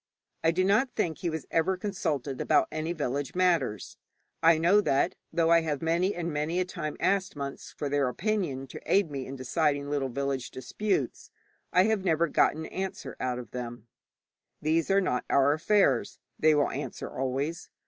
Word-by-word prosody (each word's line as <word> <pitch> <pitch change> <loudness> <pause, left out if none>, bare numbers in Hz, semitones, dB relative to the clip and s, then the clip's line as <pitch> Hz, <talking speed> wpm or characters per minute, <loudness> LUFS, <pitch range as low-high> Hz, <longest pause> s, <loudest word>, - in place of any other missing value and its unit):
I 165 - +4
do 180 +3 +2
not 210 +8 +3
think 165 -7 -1
he 175 - -1
was 160 -3 -4
ever 175 +3 +2
consulted 150 -9 -2
about - - +3
any 155 +2 -2
village 145 -3 -3
matters. 165 - +1 0.4
I 165 0 +6
know 175 +6 +4
that, 140 -1 +1 0.2
though 165 -1 +2
I 170 0 +6
have 155 -2 -2
many 170 +4 +1
and 170 -2 -3
many 155 +4 -1
a 185 - +1
time 170 -4 -5
asked 195 -1 +1
monks 140 -1 -6
for 145 - -2
their 140 -1 +1
opinion 175 - -1
to - - -8
aid 195 -6 +3
me 135 -2 -4
in 135 - -6
deciding 145 +2 0
little 140 -2 0
village 135 0 -2
disputes, 205 +10 -2 0.4
I 180 - +5
have 215 -2 +1
never 170 -2 +2
got - - +3
an 160 +1 -5
answer 190 +3 -5
out 125 -1 -1
of 120 -4 -8
them. 120 -2 -6 0.7
'These 160 +3 +1
are 195 +1 +4
not 125 -9 0
our 140 +1 +4
affairs,' 155 - +2 0.2
they 155 0 +5
will 145 -1 +2
answer - - -5
always. 135 +6 -3
160 Hz, 180 wpm, -28 LUFS, 140-180 Hz, 0.7 s, I